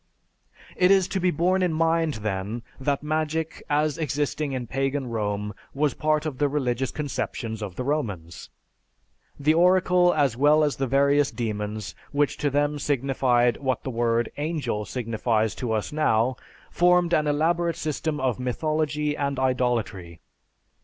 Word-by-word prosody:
It 180 Hz, 0 st, +4 dB
is 190 Hz, -2 st, +5 dB
to 190 Hz, -, -1 dB
be 180 Hz, 0 st, +2 dB
borne 180 Hz, +4 st, +1 dB
in 180 Hz, -3 st, +1 dB
mind, 165 Hz, -1 st, +1 dB
then, 105 Hz, +3 st, -3 dB, 0.2 s
that 140 Hz, +1 st, -1 dB
magic 155 Hz, +1 st, -2 dB
as 150 Hz, +1 st, +1 dB
existing 145 Hz, 0 st, -1 dB
in 130 Hz, -2 st, -3 dB
pagan 135 Hz, +3 st, -1 dB
Rome 105 Hz, -3 st, -2 dB, 0.2 s
was 145 Hz, -1 st, +1 dB
part 155 Hz, 0 st, 0 dB
of 145 Hz, -5 st, -4 dB
the 145 Hz, -1 st, +2 dB
religious 130 Hz, -3 st, -1 dB
conceptions 115 Hz, -6 st, -4 dB
of 100 Hz, -4 st, -5 dB
the 125 Hz, -, -3 dB
Romans. 100 Hz, -, -3 dB, 0.9 s
The 150 Hz, +2 st, +3 dB
oracle 180 Hz, +1 st, +4 dB
as 140 Hz, -6 st, +2 dB
well 150 Hz, +4 st, +4 dB
as 145 Hz, -5 st, 0 dB
the 135 Hz, -, -1 dB
various 140 Hz, +2 st, +3 dB
demons, 105 Hz, -4 st, -4 dB, 0.2 s
which 145 Hz, 0 st, +1 dB
to 145 Hz, -, 0 dB
them 145 Hz, +1 st, 0 dB
signified 130 Hz, -4 st, +1 dB
what 130 Hz, -3 st, -2 dB
the 130 Hz, -, -4 dB
word 115 Hz, 0 st, 0 dB
"angel" 145 Hz, -8 st, -2 dB
signifies 110 Hz, -2 st, -1 dB
to 120 Hz, -3 st, -2 dB
us 110 Hz, +5 st, -2 dB
now, 130 Hz, -5 st, +2 dB, 0.4 s
formed 175 Hz, 0 st, +3 dB
an 150 Hz, -2 st, +2 dB
elaborate 165 Hz, +3 st, +1 dB
system 155 Hz, 0 st, -2 dB
of 130 Hz, -4 st, 0 dB
mythology 150 Hz, +3 st, -1 dB
and 140 Hz, -2 st, -2 dB
idolatry. 120 Hz, -10 st, -1 dB
140 Hz, 150 wpm, -25 LUFS, 120-155 Hz, 0.9 s, is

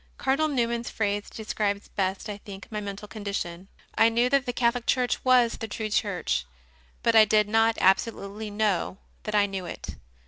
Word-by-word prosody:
Cardinal 275 Hz, +4 st, +1 dB
Newman 235 Hz, -5 st, 0 dB
s 235 Hz, -, -6 dB
phrase 205 Hz, -1 st, -2 dB
describes 210 Hz, -2 st, -2 dB
best, 190 Hz, +1 st, -2 dB
I 205 Hz, -1 st, -5 dB
think, 200 Hz, -1 st, -10 dB
my 210 Hz, -1 st, -3 dB
mental 200 Hz, 0 st, -6 dB
condition. 200 Hz, -4 st, -5 dB, 0.3 s
I 225 Hz, -, +5 dB
knew 240 Hz, +2 st, +2 dB
that 275 Hz, -1 st, +2 dB
the -, -, +1 dB
Catholic 240 Hz, 0 st, 0 dB
Church 250 Hz, -2 st, +1 dB
was 250 Hz, -2 st, +4 dB
the 225 Hz, -, -4 dB
true 215 Hz, 0 st, -4 dB
Church, 195 Hz, -, 0 dB, 0.6 s
but 230 Hz, -1 st, +3 dB
I 220 Hz, -, +9 dB
did 215 Hz, 0 st, +3 dB
not 225 Hz, +1 st, +3 dB
absolutely 200 Hz, +2 st, +1 dB
know 205 Hz, -3 st, 0 dB, 0.3 s
that 215 Hz, -1 st, -2 dB
I 205 Hz, -1 st, +5 dB
knew 195 Hz, -3 st, -5 dB
it. -, -, -7 dB
215 Hz, 180 wpm, -26 LUFS, 200-235 Hz, 0.6 s, I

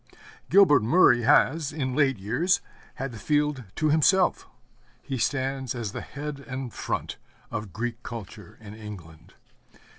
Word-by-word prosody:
Gilbert 160 Hz, -8 st, +6 dB
Murray 120 Hz, 0 st, +5 dB
has, 145 Hz, +4 st, +3 dB
in 130 Hz, -4 st, -3 dB
late 135 Hz, -4 st, +2 dB
years, 125 Hz, -, +1 dB, 0.4 s
had 135 Hz, 0 st, -4 dB
the 115 Hz, -, -9 dB
field 150 Hz, 0 st, 0 dB
to 155 Hz, -1 st, +1 dB
himself. 180 Hz, +5 st, +3 dB, 0.6 s
He 135 Hz, -2 st, -4 dB
stands 130 Hz, -1 st, -1 dB
as 115 Hz, -4 st, -4 dB
the -, -, -5 dB
head 145 Hz, 0 st, -7 dB
and 130 Hz, -2 st, -5 dB
front -, -, -4 dB, 0.3 s
of 105 Hz, -2 st, -5 dB
Greek 115 Hz, +3 st, -4 dB
culture 110 Hz, -3 st, -9 dB
in 105 Hz, -2 st, -11 dB
England. 100 Hz, -7 st, -11 dB
130 Hz, 140 wpm, -26 LUFS, 110-150 Hz, 0.6 s, Gilbert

